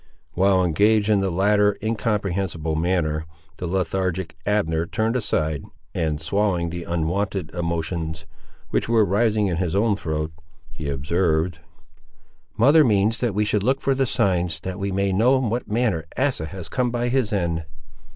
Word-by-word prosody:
While 95 Hz, 0 st, +3 dB
engaged 105 Hz, +5 st, +3 dB
in 105 Hz, -2 st, +4 dB
the 95 Hz, 0 st, 0 dB
latter 105 Hz, +3 st, +3 dB
incomprehensible 100 Hz, -7 st, -1 dB
manner, 80 Hz, -2 st, 0 dB, 0.3 s
the 90 Hz, -, -4 dB
lethargic 95 Hz, -1 st, -1 dB
Abner 85 Hz, -6 st, +1 dB
turned 110 Hz, +5 st, -1 dB
aside, 80 Hz, -, -1 dB, 0.3 s
and 80 Hz, -2 st, -1 dB
swallowing 90 Hz, 0 st, 0 dB
the 85 Hz, 0 st, -5 dB
unwonted 90 Hz, +2 st, -2 dB
emotions 85 Hz, -1 st, -3 dB, 0.5 s
which -, -, 0 dB
were 115 Hz, -2 st, +4 dB
rising 105 Hz, +2 st, +2 dB
in 90 Hz, -4 st, -1 dB
his 90 Hz, -1 st, -1 dB
own 105 Hz, +1 st, +3 dB
throat, 80 Hz, -3 st, -3 dB, 0.4 s
he 75 Hz, -3 st, -5 dB
observed— 80 Hz, +3 st, 0 dB, 1.0 s
"Mother 145 Hz, +8 st, +6 dB
means 110 Hz, -2 st, +2 dB
that 120 Hz, -6 st, -1 dB
we 105 Hz, +1 st, +2 dB
should 105 Hz, -1 st, +1 dB
look 130 Hz, +6 st, +1 dB
for 135 Hz, -, +1 dB
the 135 Hz, 0 st, +1 dB
signs, 90 Hz, -5 st, +1 dB
that 95 Hz, +1 st, -5 dB
we 100 Hz, 0 st, -2 dB
may 100 Hz, +1 st, 0 dB
know 120 Hz, +7 st, +4 dB
in 125 Hz, -5 st, -1 dB
what 120 Hz, 0 st, -3 dB
manner 105 Hz, -8 st, 0 dB
Asa 130 Hz, -, 0 dB
has 95 Hz, -1 st, -7 dB
come 125 Hz, +8 st, 0 dB
by 120 Hz, 0 st, -1 dB
his 125 Hz, -4 st, +1 dB
end." 85 Hz, -5 st, -1 dB
95 Hz, 160 wpm, -23 LUFS, 85-105 Hz, 1.0 s, Mother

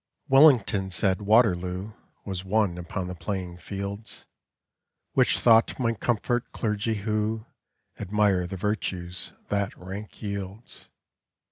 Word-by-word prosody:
Wellington 125 Hz, -9 st, +5 dB
said 95 Hz, +1 st, +1 dB
Waterloo 100 Hz, -2 st, +2 dB, 0.3 s
Was 95 Hz, -2 st, -4 dB
won 95 Hz, -2 st, +1 dB
upon 90 Hz, +2 st, -4 dB
the 90 Hz, -, -5 dB
playing 90 Hz, -1 st, -4 dB
fields, 100 Hz, +3 st, -6 dB, 0.9 s
Which -, -, +3 dB
thought 115 Hz, -1 st, +5 dB
might 115 Hz, -4 st, 0 dB
comfort 120 Hz, +1 st, 0 dB
clergy 110 Hz, 0 st, -1 dB
who 110 Hz, +1 st, -1 dB, 0.5 s
Admire 100 Hz, -3 st, +2 dB
the 95 Hz, -, -6 dB
virtues 95 Hz, -3 st, -3 dB, 0.2 s
that 100 Hz, -1 st, -1 dB
rank 95 Hz, +3 st, -8 dB
yields. 100 Hz, +1 st, -6 dB
100 Hz, 110 wpm, -26 LUFS, 95-110 Hz, 0.9 s, Wellington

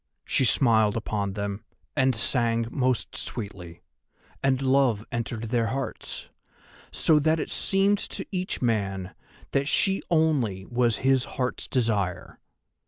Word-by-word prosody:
She 135 Hz, -, +2 dB
smiled 110 Hz, -3 st, +3 dB
upon 100 Hz, -3 st, -2 dB
them, 100 Hz, +1 st, -4 dB, 0.3 s
and 130 Hz, -3 st, +3 dB
sang 115 Hz, 0 st, +1 dB
most 130 Hz, -2 st, 0 dB
sweetly, 95 Hz, -7 st, -6 dB, 0.6 s
and 135 Hz, -1 st, +2 dB
love 130 Hz, -5 st, +2 dB
entered 115 Hz, -1 st, -3 dB
their 115 Hz, -2 st, +2 dB
hearts, 135 Hz, +3 st, -4 dB, 0.6 s
so 155 Hz, -2 st, +4 dB
that 160 Hz, +2 st, +2 dB
it -, -, -3 dB
seemed 195 Hz, +1 st, +2 dB
to -, -, -4 dB
each 185 Hz, -7 st, -2 dB
man 100 Hz, -5 st, -1 dB, 0.4 s
that 140 Hz, 0 st, +1 dB
she 195 Hz, +4 st, +3 dB
only 140 Hz, -, +1 dB
was 120 Hz, -1 st, +1 dB
his 135 Hz, -1 st, +4 dB
Heart's 125 Hz, -1 st, -2 dB
Desire. 100 Hz, -8 st, -1 dB
120 Hz, 125 wpm, -26 LUFS, 105-135 Hz, 0.6 s, so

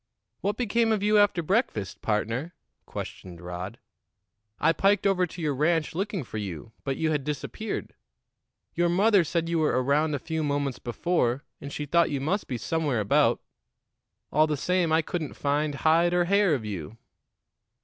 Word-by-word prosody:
"What 205 Hz, +2 st, -1 dB
became 230 Hz, -1 st, +1 dB
of 210 Hz, -2 st, +1 dB
you 210 Hz, 0 st, +4 dB
after 200 Hz, -4 st, +3 dB
breakfast, 160 Hz, -, -1 dB
partner?" 115 Hz, +9 st, -1 dB, 0.3 s
questioned 90 Hz, -2 st, -7 dB
Rod. 90 Hz, +5 st, -6 dB, 0.8 s
"I 165 Hz, +2 st, +4 dB
piked 195 Hz, +4 st, +2 dB
over 185 Hz, -2 st, +3 dB
to 170 Hz, +2 st, -9 dB
your 150 Hz, -2 st, +1 dB
ranch 155 Hz, +3 st, +1 dB
looking 195 Hz, -1 st, -2 dB
for 110 Hz, -2 st, -6 dB
you, 100 Hz, +1 st, -6 dB
but 135 Hz, -1 st, -2 dB
you 160 Hz, -1 st, +1 dB
had 150 Hz, -3 st, 0 dB
disappeared. 150 Hz, +9 st, -4 dB, 0.8 s
Your 175 Hz, 0 st, +2 dB
mother 200 Hz, +2 st, +4 dB
said 165 Hz, 0 st, -1 dB
you 170 Hz, -1 st, 0 dB
were 150 Hz, -4 st, +2 dB
around 150 Hz, +3 st, +2 dB
a -, -, 0 dB
few 160 Hz, +4 st, -3 dB
moments 140 Hz, -2 st, -1 dB
before, 130 Hz, 0 st, 0 dB, 0.2 s
and 140 Hz, -, -7 dB
she 150 Hz, -, -4 dB
thought 170 Hz, +3 st, +3 dB
you 140 Hz, -, -1 dB
must 185 Hz, +10 st, -1 dB
be 125 Hz, -, -3 dB
somewhere 145 Hz, -1 st, -1 dB
about; 105 Hz, -, +3 dB, 0.9 s
all 155 Hz, +1 st, +4 dB
the 150 Hz, -1 st, -1 dB
same, 180 Hz, +2 st, +1 dB
I 160 Hz, 0 st, +3 dB
couldn't 155 Hz, -2 st, -4 dB
find 145 Hz, +1 st, 0 dB
hide 165 Hz, +4 st, +3 dB
or 175 Hz, -1 st, +3 dB
hair 200 Hz, -3 st, +3 dB
of 115 Hz, -5 st, -5 dB
you." 100 Hz, 0 st, -6 dB
155 Hz, 170 wpm, -27 LUFS, 135-180 Hz, 0.9 s, you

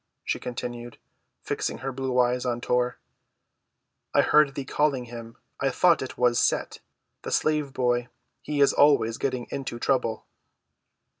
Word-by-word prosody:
she -, -, -2 dB
continued, 120 Hz, -1 st, -6 dB, 0.5 s
fixing -, -, -2 dB
her 135 Hz, -, -1 dB
blue 130 Hz, -1 st, -1 dB
eyes 125 Hz, 0 st, +2 dB
on 120 Hz, -2 st, -1 dB
Tor. 125 Hz, 0 st, 0 dB, 1.2 s
"I -, -, +6 dB
heard 150 Hz, -2 st, +4 dB
thee 140 Hz, -, -4 dB
calling 140 Hz, -3 st, 0 dB
him. 115 Hz, 0 st, -10 dB, 0.2 s
I 135 Hz, -, +1 dB
thought 170 Hz, +6 st, +3 dB
it 130 Hz, -, -6 dB
was 120 Hz, -1 st, +3 dB
Set, -, -, 0 dB, 0.4 s
the -, -, -6 dB
slave 150 Hz, -2 st, +1 dB
boy; 120 Hz, -2 st, 0 dB, 0.3 s
he 145 Hz, -1 st, -2 dB
is 140 Hz, -, +5 dB
always 140 Hz, -6 st, +3 dB
getting 130 Hz, -3 st, -2 dB
into 135 Hz, -3 st, -4 dB
trouble." 120 Hz, -3 st, 0 dB
125 Hz, 145 wpm, -26 LUFS, 120-140 Hz, 1.2 s, I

